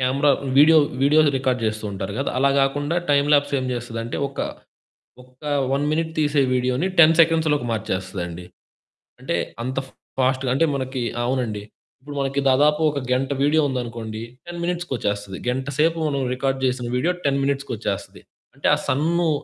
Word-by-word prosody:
Camera 135 +3 +2 0.3
video, 160 +2 +8 0.2
videos 150 +1 +5
record 130 -2 0
జేస్తూ 110 0 -2
ఉంటారు 95 0 -4
గదా! 135 - -1
అలా 140 +1 +3
గాకుండా 145 +4 0
టైమ్ 140 0 +3
ల్యాప్స్ 145 -1 +3
ఏం 130 - -3
జేస్తదంటే 120 -1 -4
ఒక, 135 - -16 0.9
ఒక్క 125 +3 -23 0.3
1 140 +1 0
మినిట్ 160 +1 -1
తీసే 145 -1 +2
వీడియో‌ని 125 +6 +1
10 165 -1 +8
సెకండ్స్‌లోకి 160 -4 +2
మార్చేస్తదండి. 95 -4 -4 0.8
అంటే, - - -2 0.3
అంత 130 +2 -4
ఫ్ - - -20 0.3
ఫాస్ట్‌గా 130 0 +1
అంటే 165 - +3
మనకి 130 -2 -3 0.2
అవునండి. 120 -5 -2 0.4
ఇప్పుడు 145 +1 -9
మనకి 135 +1 -1
దాదాపు 150 +4 +3
ఒక 145 - -3
గంట 130 +1 0
వీడియో 155 +2 +3
ఉందనుకోండి, 115 -3 -5 0.3
10 175 0 -6
మినిట్స్‌కొచ్చేస్తది. 115 - -3
గంట 130 +2 -2
సేపు 165 +1 +3
మనం 140 -1 -1
రికార్డ్ 135 0 -1
జేసిన 125 -1 -1
వీడియో 165 +8 +1
10 140 -1 +2
మినిట్స్‌కొచ్చేస్తది. 120 -9 -3 0.3
అంటే, - - -1
ఆ - - -4
సన్ను 165 +4 +1
135 Hz, 150 wpm, -22 LUFS, 120-150 Hz, 0.9 s, వీడియో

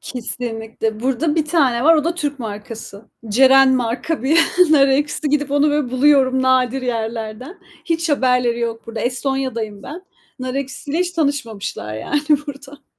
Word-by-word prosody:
Kesinlikle. 225 -3 -3
Burada 270 +5 0
1 320 - +1
tane 280 -6 +1
var. 330 - +7
O 305 -2 +1
da 335 +1 0
Türk 290 -4 -3
markası. 215 -1 -8 0.2
Ceren 265 +4 +5
marka 250 +5 -2
bir 300 +5 +3 0.3
nar 280 -3 +5
ekşisi. 290 +2 0
Gidip 290 -1 0
onu 290 +1 +3
böyle 290 -4 -1
buluyorum 260 -1 +3
nadir 260 0 +2
yerlerden. 230 - -4 0.2
Hiç 330 0 -1
haberleri 250 -4 +1
yok 230 -1 -4
burada. 230 0 -6
Estonya'dayım 250 -5 -3
ben. 340 - -9 0.4
Nar 255 0 -4
ekşisiyle 280 +3 -4
hiç 360 0 -1
tanışmamışlar 270 - -3
yani 285 - -2 0.2
burada. 280 0 -10
260 Hz, 150 wpm, -19 LUFS, 235-290 Hz, 0.4 s, var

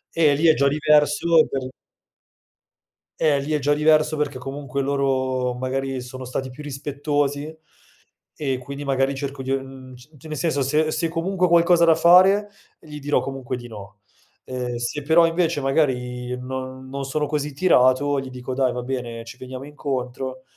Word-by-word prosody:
Eh, 155 -3 +4
lì 160 +4 +2
è 160 - +7
già 140 -1 +2
diverso 150 +2 +3
per 130 -1 -3 1.5
Eh, 150 -3 +3
lì 145 +3 -4
è - - +3
già 145 0 +1
diverso, 155 +1 +3
perché 145 -3 -2
comunque 140 +1 -4
loro 130 -2 0
magari 130 +1 -3
sono 130 +1 -8
stati 130 +1 -4
più 140 - -11
rispettosi, 145 +1 -2 0.8
e 135 -4 -1
quindi 140 +3 -7
magari 135 0 +1
cerco 140 0 -5
di 130 - -6
uhm, 135 -1 -5
c 140 +3 -18
nel 155 -1 -5
senso, 155 -3 0
se 155 +4 +1
se 160 +2 0
comunque 180 +2 0
ho - - -4
qualcosa 170 0 +5
da 165 -1 +6
fare, 185 +5 +5 0.3
gli 150 -1 -10
dirò 145 +1 +1
comunque 135 -2 -5
di 120 0 -9
no, 105 -2 -11 0.4
ehm, 125 -1 -4
se 120 +5 -3
però 160 +4 +5
invece, 165 -2 0
magari, 125 -3 -1
non 130 +1 -6
non 135 0 -4
sono 150 +2 -1
così 150 0 -3
tirato, 140 -3 +3
gli 135 -1 -6
dico: 125 0 -6
"Dai 130 -1 +1
va 125 0 -4
bene, 120 -3 -4
ci 115 +2 -11
veniamo 130 +1 -8
incontro," 130 -3 -5
140 Hz, 170 wpm, -23 LUFS, 130-150 Hz, 1.5 s, è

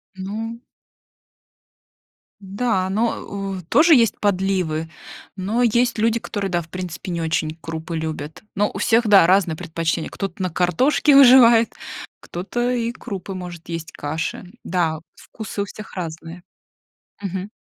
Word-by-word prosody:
Ну. 220 +5 -5 1.8
Н-да, 195 -1 -1
но, 225 +4 +1
э, 195 -1 -5
у - - -8
тоже 320 +2 +6
есть 230 -4 +3
подливы, 185 -5 0 0.5
но 205 +6 0
есть 240 +1 +2
люди, 225 +1 +2
которые 200 -3 -4
да, 175 -1 +1
в 165 - -14
принципе, 180 0 -6
не 170 -1 -2
очень 160 -1 -1
крупы 165 +1 -5
любят. 155 0 -5
Но 205 +1 +2
у - - -6
всех 230 0 +3
да, 200 -5 +7
разные 180 -3 +3
предпочтения, 160 +1 -2
кто-то 195 -2 -5
на 185 - 0
картошке 220 - +3
выживает, 245 -4 +7 0.5
кто-то 240 +8 -3
и 235 -2 -1
крупы 200 -6 -7
может 175 -2 -8
есть, 165 -1 -5
каши. 160 +5 -4 0.2
Да, 165 -3 0 0.2
вкусы 215 -2 -7
у - - -1
всех 210 +2 -11
разные. 165 0 -6 0.8
Мгм. 195 0 -4
190 Hz, 140 wpm, -21 LUFS, 165-225 Hz, 1.8 s, да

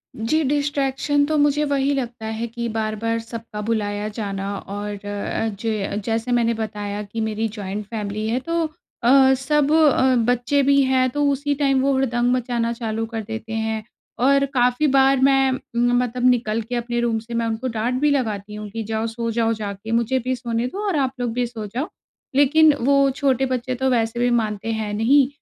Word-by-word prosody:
जी, 300 +8 0
distraction 285 0 +1
तो 310 +1 0
मुझे 290 0 +3
वही 280 0 +1
लगता 240 -4 -4
है 220 +1 -3
कि 235 +1 -4
बार-बार 220 +1 -2
सबका 225 -2 -7
बुलाया 210 -1 -1
जाना 200 -1 -3
और 205 0 -6
अ, 205 +2 -2
जे 210 -3 -2
जैसे 230 +2 -1
मैंने 235 -1 +2
बताया 210 -2 -4
कि 220 +3 -5
मेरी 220 0 -1
जॉइंट 205 +1 -5
फ़ैमिली 215 0 -4
है, 240 +3 0
तो 335 +3 -1 0.4
अ, 265 +2 +6
सब 290 +2 +1
अ, 280 -5 +4
बच्चे 245 +3 +2
भी 280 +1 +4
हैं, 260 -1 +2
तो 290 +3 0
उसी 285 +1 -1
टाइम 275 -2 +2
वो 275 - +2
हुड़दंग 245 -2 +1
मचाना 235 -2 -1
चालू 225 -1 -3
कर 225 -1 -5
देते 225 +1 -6
हैं 220 -1 -2 0.4
और 275 0 +4
काफ़ी 250 +3 +2
बार 270 0 +4
मैं 270 -1 +4 0.3
मतलब 245 0 +1
निकल 230 -2 +1
के 245 +3 -5
अपने 240 0 -2
रूम 230 -2 +1
से, 230 +2 -10
मैं 230 0 0
उनको 225 +3 -2
डाँट 230 +1 -1
भी 295 - +4
लगाती 210 -6 -2
हूँ 210 0 -7
कि, 225 +2 -4
"जाओ, 220 +1 -2
सो 230 0 -3
जाओ 230 0 +1
जाके। 210 0 -6
मुझे 235 +3 +1
भी 255 +1 -2
सोने 235 -1 -2
दो 405 +10 -5
और 370 - 0
आप 265 -2 +1
लोग 245 -2 -1
भी 245 0 0
सो 225 -3 -7
जाओ।" 255 - -3 0.5
लेकिन 300 +2 +5
वो 275 +1 +4
छोटे 270 -2 +1
बच्चे 255 0 -2
तो 265 +1 0
वैसे 230 -1 0
भी 245 0 +2
मानते 220 -2 -1
हैं 215 -2 -3
नहीं 255 +6 +4
235 Hz, 190 wpm, -22 LUFS, 220-265 Hz, 0.5 s, अ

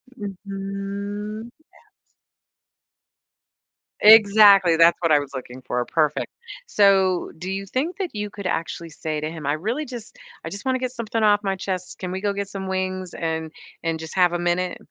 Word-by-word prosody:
Mhm, 200 +2 -6 0.6
yes. - - -44 1.9
Exactly, 205 -4 +7
that's 165 +1 +6
what 165 - +2
I 150 - +7
was 145 -1 -7
looking 130 -1 -8
for, 125 0 -1
perfect. 150 -2 0 0.4
So, 195 - +3
do 180 +3 -6
you 195 0 -3
think 290 - -2
that 380 -4 -3
you 210 -1 -4
could 200 -2 -9
actually 165 -1 -3
say 155 -1 -4
to 155 +1 -3
him, 160 -3 -8
"I 145 - +2
really 230 - -2
just 245 - -9 0.3
I - - -3
just 200 +5 -8
wanna 260 0 +1
get 255 -1 -2
something 230 -2 -3
off 205 0 +4
my 195 -1 0
chest, 185 -1 -5
can 180 -1 -5
we 190 +1 -4
go 205 -1 0
get 200 0 -3
some 195 -1 -6
wings 185 -1 -3
and 160 -1 -3 0.3
and 165 -1 -1
just 160 -1 -8
have 180 -2 +4
a 175 - -1
minute?" 175 +1 0
195 Hz, 175 wpm, -23 LUFS, 170-210 Hz, 1.9 s, Exactly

